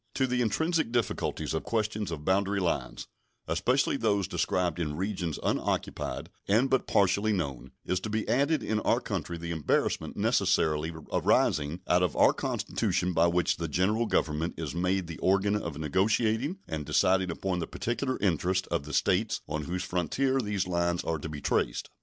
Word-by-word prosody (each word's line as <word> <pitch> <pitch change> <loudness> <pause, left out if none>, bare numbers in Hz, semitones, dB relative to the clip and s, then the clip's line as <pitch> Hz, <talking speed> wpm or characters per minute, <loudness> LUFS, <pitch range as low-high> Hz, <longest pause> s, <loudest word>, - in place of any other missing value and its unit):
To 135 - +2
the 125 -1 0
intrinsic 160 +4 +1
difficulties 120 -8 -1
of 80 - -1
questions 110 -2 -1
of 75 -3 -6
boundary 100 +1 +2
lines, 90 -3 -2 0.4
especially 125 +13 +1
those 100 -5 +1
described 90 -3 0
in 75 -3 -2
regions 90 -4 -2
unoccupied - - -2 0.2
and 115 +7 +3
but 130 - +2
partially 100 +2 +3
known, 70 - -3 0.2
is 90 +1 0
to 110 - -5
be 110 0 -2
added 140 +5 +2
in 110 -1 0
our - - +2
country 85 - -4
the 85 0 -5
embarrassment 80 -3 0
necessarily 80 +1 +2 0.2
arising 75 +4 +2
out 90 0 +4
of 90 -4 0
our - - +5
Constitution 90 +1 -1
by 85 +1 +4
which 85 0 +1
the 85 - -3
General 100 +9 +1
Government 80 -1 0
is 80 -4 -4
made 90 +2 0
the 85 -1 -8
organ 100 +2 +2
of 85 -8 -3
negotiating 110 - +1
and 80 -2 -3
deciding 95 +5 +2
upon 90 +1 -2
the 80 - -3
particular 130 +2 -2
interests 95 0 +1
of 70 - -1
the 75 - -7
States 100 +3 +1
on 75 0 -3
whose 90 +3 -3
frontiers 130 - 0
these 105 -4 -1
lines 85 -1 0
are 80 -2 -2
to 80 - -6
be 75 -2 -6
traced. - - -1
90 Hz, 170 wpm, -29 LUFS, 85-110 Hz, 0.4 s, our